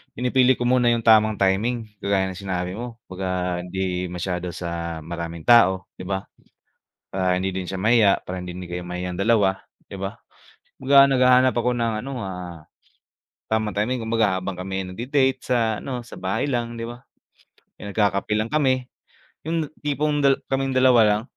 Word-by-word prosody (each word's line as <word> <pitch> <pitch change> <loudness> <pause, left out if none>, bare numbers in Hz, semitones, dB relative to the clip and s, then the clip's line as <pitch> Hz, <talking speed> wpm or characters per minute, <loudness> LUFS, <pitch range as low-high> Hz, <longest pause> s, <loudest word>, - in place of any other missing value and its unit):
pinipili 125 +1 +3
ko 120 - -4
muna 125 0 +3
'yong 115 -1 +2
tamang 110 -1 +5
timing, 110 +6 +1 0.2
kagaya 95 -1 0
ng 95 - -9
sinabi 90 -2 -3
mo. 115 +3 -6 0.2
'Baga 90 -1 -2
hindi 90 -1 -2
masyado 90 0 -4
sa 85 -2 -5
maraming 85 -1 -6
tao, 95 -6 +4
'di 90 - -7
ba, 95 0 -2 0.8
para 90 -1 0
hindi 95 0 -2
din 95 - -2
siya 95 - -4
mahiya, 110 -1 +4
para 90 0 -5
hindi 90 - -6
din 90 0 -8
kayo 90 0 -5
mahiyang 90 0 -5
dalawa, 100 -1 +2 0.2
'di - - -9
ba. 95 +1 -5 0.6
Kumbaga 140 +1 +6
naghahanap 130 -1 +5
ako 125 +1 +1
ng 115 -2 -1
ano, 140 - -5
ah, 90 -4 -7 0.9
tamang 110 -1 0
timing, 115 +4 -1
kumbaga 110 -4 +1
habang 95 0 -4
kami 95 +1 -3
ay - - -7
nagde-date 130 +5 +1
sa 115 -4 +1
ano, 125 -3 -5
sa 120 - -11
bahay 95 +1 -1
lang, 120 -4 -2
'di 115 - -5
ba, 120 +2 -9 0.7
'yong 100 - -6
nagkakape 100 0 +1
lang 110 +1 -1
kami. 130 -4 +2 0.6
'Yong 165 - 0
na - - -6
tipong 145 0 0
dal 140 -1 +4 0.2
kaming 135 -1 0
dalawa 130 -2 +6
lang. 105 +1 +1
105 Hz, 175 wpm, -23 LUFS, 90-125 Hz, 0.9 s, Kumbaga